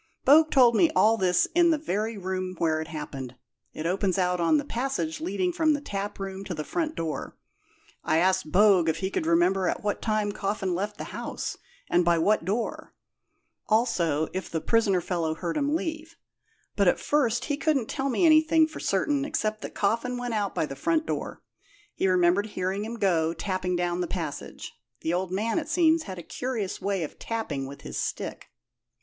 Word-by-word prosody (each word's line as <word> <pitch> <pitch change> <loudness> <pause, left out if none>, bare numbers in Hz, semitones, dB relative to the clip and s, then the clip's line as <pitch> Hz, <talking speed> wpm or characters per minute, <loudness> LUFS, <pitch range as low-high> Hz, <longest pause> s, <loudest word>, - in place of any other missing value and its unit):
Bogue 310 +3 +7
told 245 -5 +5
me 330 - +5
all 220 +1 +5
this 180 -4 +2
in 345 0 +5
the 320 - +3
very 220 -6 -2
room 185 -1 -3
where 160 -2 +1
it 160 - -6
happened. 140 -5 -6 0.4
It 155 - -6
opens 185 +1 0
out 180 -1 +1
on 170 - +3
the 290 - -2
passage 230 - -2
leading 180 +1 -1
from 315 -1 +3
the - - -3
taproom 195 -4 -5
to 180 - -4
the 155 - -4
front 320 - -2
door. 160 -2 -4 0.7
I 155 - +2
asked 185 -2 +2
Bogue 190 -4 +5
if 160 - 0
he 190 +3 -3
could 160 - -2
remember 180 +3 +3
at - - -2
what 205 -1 -1
time 215 -2 0
Coffin 195 -2 -2
left 205 +4 -3
the - - -5
house, - - -4 0.3
and 175 - +3
by 170 0 +3
what 200 +3 +2
door; 215 +5 -3 0.7
also, 175 - +2
if 185 - -4
the 165 - -2
prisoner 200 +1 +2
fellow 165 -3 -1
heard 170 -1 -3
him 290 +1 +1
leave; 325 0 -4 0.6
but - - +3
at - - +3
first 245 -6 +1
he 290 - -1
couldn't 290 -5 +1
tell 275 -1 -2
me 275 +7 +2
anything 315 0 +5
for 315 - -9
certain 275 +9 0
except 220 -8 -2
that - - -7
Coffin 230 +5 0
went 245 -1 -3
out 205 -3 -1
by - - +1
the 135 - -7
front 320 - 0
door - - -4 0.5
he - - 0
remembered 185 +2 +3
hearing 190 0 -2
him 230 +2 -5
go 170 -6 +1
tapping 185 -2 -2
down 175 0 -1
the 175 - -1
passage. 160 -6 -6 0.3
The 165 - -1
old 180 0 -1
man, 220 - 0
it 305 -1 -7
seems, 330 -1 +3
had 185 - -6
a 175 - -7
curious 225 0 -4
way 195 -2 -1
of 150 - -8
tapping 160 -13 -3
with 140 +1 -10
his - - -5
stick." - - -4
195 Hz, 195 wpm, -27 LUFS, 175-245 Hz, 0.7 s, Bogue